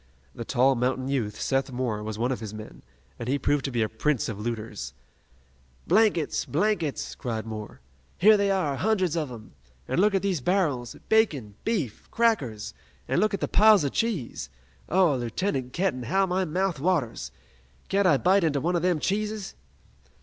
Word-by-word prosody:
The 115 Hz, -, -6 dB
tall 130 Hz, +3 st, +3 dB
mountain 130 Hz, +1 st, -1 dB
youth, 115 Hz, -7 st, -2 dB
Seth 135 Hz, 0 st, 0 dB
Moore, 120 Hz, -4 st, -2 dB
was 105 Hz, 0 st, -5 dB
one 120 Hz, +3 st, 0 dB
of 130 Hz, -, -2 dB
his 110 Hz, -1 st, -7 dB
men, 110 Hz, 0 st, -10 dB, 0.4 s
and 115 Hz, -, -4 dB
he 140 Hz, -, +2 dB
proved 145 Hz, 0 st, +1 dB
to 135 Hz, -, -2 dB
be 120 Hz, -2 st, +1 dB
a -, -, 0 dB
prince 125 Hz, +4 st, 0 dB
of 105 Hz, -3 st, -5 dB
looters. 110 Hz, -1 st, -5 dB, 0.9 s
"Blankets! 205 Hz, -8 st, +2 dB
blankets!" 170 Hz, -3 st, -1 dB
cried 115 Hz, -3 st, -4 dB
Moore. 110 Hz, -, -7 dB, 0.4 s
"Here 215 Hz, +3 st, +7 dB
they 200 Hz, -1 st, +2 dB
are, 160 Hz, -8 st, 0 dB
hundreds 190 Hz, -5 st, +1 dB
of 155 Hz, -4 st, -1 dB
'em! 115 Hz, -3 st, -10 dB, 0.4 s
An' 175 Hz, -, +1 dB
look 205 Hz, 0 st, +3 dB
at 195 Hz, -, +1 dB
these 190 Hz, -7 st, 0 dB
barrels! 145 Hz, -8 st, 0 dB
Bacon! 150 Hz, -, +2 dB
Beef! 170 Hz, -, -2 dB
Crackers! 125 Hz, -, 0 dB, 0.3 s
An' -, -, +1 dB
look 215 Hz, -1 st, +2 dB
at -, -, -8 dB
the -, -, 0 dB
piles 210 Hz, -3 st, +6 dB
of 140 Hz, -, -1 dB
cheese! 205 Hz, -, -2 dB, 0.4 s
Oh, 175 Hz, -4 st, +4 dB
Lieutenant 125 Hz, -, -2 dB
Kenton, 170 Hz, -6 st, -1 dB
how 190 Hz, +12 st, +1 dB
my 185 Hz, 0 st, 0 dB
mouth 180 Hz, 0 st, -1 dB
waters! 150 Hz, -, -1 dB, 0.6 s
Can't 200 Hz, -1 st, +2 dB
I 150 Hz, -6 st, +5 dB
bite 185 Hz, +5 st, +3 dB
into 150 Hz, -3 st, +1 dB
one 175 Hz, +6 st, 0 dB
o' -, -, +3 dB
them 180 Hz, 0 st, +1 dB
cheeses?" 210 Hz, +4 st, -2 dB
145 Hz, 180 wpm, -26 LUFS, 120-195 Hz, 0.9 s, Here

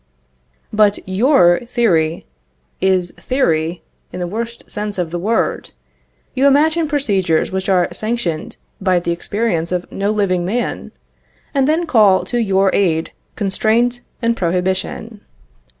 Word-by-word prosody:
But 210 Hz, -1 st, +4 dB
your 190 Hz, -3 st, +4 dB
theory 175 Hz, -10 st, +1 dB, 0.6 s
is 185 Hz, -2 st, +2 dB
theory 170 Hz, -, 0 dB, 0.3 s
in -, -, -6 dB
the 180 Hz, -, -2 dB
worst 230 Hz, +5 st, -5 dB
sense 210 Hz, -1 st, -4 dB
of 175 Hz, -3 st, -2 dB
the 175 Hz, -, -3 dB
word. 220 Hz, +6 st, -1 dB, 0.6 s
You 265 Hz, +2 st, +3 dB
imagine 310 Hz, +4 st, +3 dB
procedures 195 Hz, -, +1 dB
which 190 Hz, +1 st, -2 dB
are 180 Hz, -2 st, +3 dB
sanctioned 215 Hz, -8 st, -3 dB, 0.2 s
by 185 Hz, -2 st, +2 dB
the 170 Hz, 0 st, -2 dB
experience 170 Hz, -1 st, -2 dB
of 180 Hz, -1 st, -1 dB
no 200 Hz, +1 st, -1 dB
living 195 Hz, -4 st, +1 dB
man, 235 Hz, +7 st, -3 dB, 0.6 s
and 275 Hz, -2 st, +2 dB
then 320 Hz, +3 st, +1 dB
call 215 Hz, -, +4 dB
to 240 Hz, -, -2 dB
your 195 Hz, -3 st, +2 dB
aid 165 Hz, -5 st, +1 dB, 0.2 s
constraint 225 Hz, +4 st, +1 dB, 0.2 s
and 230 Hz, 0 st, +2 dB
prohibition. 190 Hz, +4 st, -2 dB
200 Hz, 130 wpm, -18 LUFS, 180-235 Hz, 0.6 s, But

